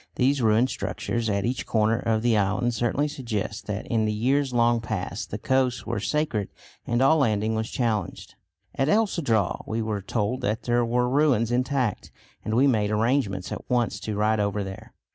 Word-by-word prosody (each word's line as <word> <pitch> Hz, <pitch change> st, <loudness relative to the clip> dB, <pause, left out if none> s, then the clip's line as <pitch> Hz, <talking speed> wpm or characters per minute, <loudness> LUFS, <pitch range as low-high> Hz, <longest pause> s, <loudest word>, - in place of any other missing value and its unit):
These 135 Hz, +2 st, +2 dB
ruined 115 Hz, +3 st, +3 dB
structures 115 Hz, -2 st, -3 dB
at 100 Hz, 0 st, 0 dB
each 125 Hz, +2 st, -2 dB
corner 110 Hz, +1 st, +2 dB
of 110 Hz, -1 st, 0 dB
the 120 Hz, -2 st, +3 dB
island 105 Hz, +4 st, +1 dB
certainly 120 Hz, +6 st, 0 dB
suggest 115 Hz, -7 st, -4 dB
that 105 Hz, 0 st, -3 dB
in 110 Hz, -2 st, 0 dB
the 105 Hz, -, 0 dB
years 130 Hz, +6 st, +1 dB
long 120 Hz, -1 st, +2 dB
past 110 Hz, -4 st, -4 dB
the -, -, -4 dB
coasts 130 Hz, -2 st, 0 dB
were 120 Hz, +1 st, -2 dB
sacred 150 Hz, -10 st, -1 dB, 0.4 s
and 120 Hz, +2 st, +2 dB
all 160 Hz, +4 st, +5 dB
landing 110 Hz, -5 st, +1 dB
was 110 Hz, 0 st, -2 dB
challenged. 115 Hz, -4 st, -2 dB, 0.4 s
At 135 Hz, +2 st, 0 dB
El 220 Hz, +4 st, +4 dB
Cedral 115 Hz, -, 0 dB
we 110 Hz, -, -2 dB
were 110 Hz, -2 st, -2 dB
told 110 Hz, +5 st, -2 dB
that 110 Hz, -3 st, -1 dB
there 120 Hz, 0 st, +2 dB
were 125 Hz, +1 st, +1 dB
ruins 125 Hz, -4 st, +2 dB
intact, 125 Hz, -2 st, -1 dB, 0.3 s
and 110 Hz, -, -2 dB
we 130 Hz, +4 st, +5 dB
made 110 Hz, -6 st, +2 dB
arrangements 105 Hz, -3 st, 0 dB
at -, -, -7 dB
once 120 Hz, -2 st, 0 dB
to 110 Hz, -, -4 dB
ride 110 Hz, +1 st, +2 dB
over 100 Hz, 0 st, 0 dB
there. 95 Hz, 0 st, -9 dB
115 Hz, 185 wpm, -25 LUFS, 110-125 Hz, 0.4 s, all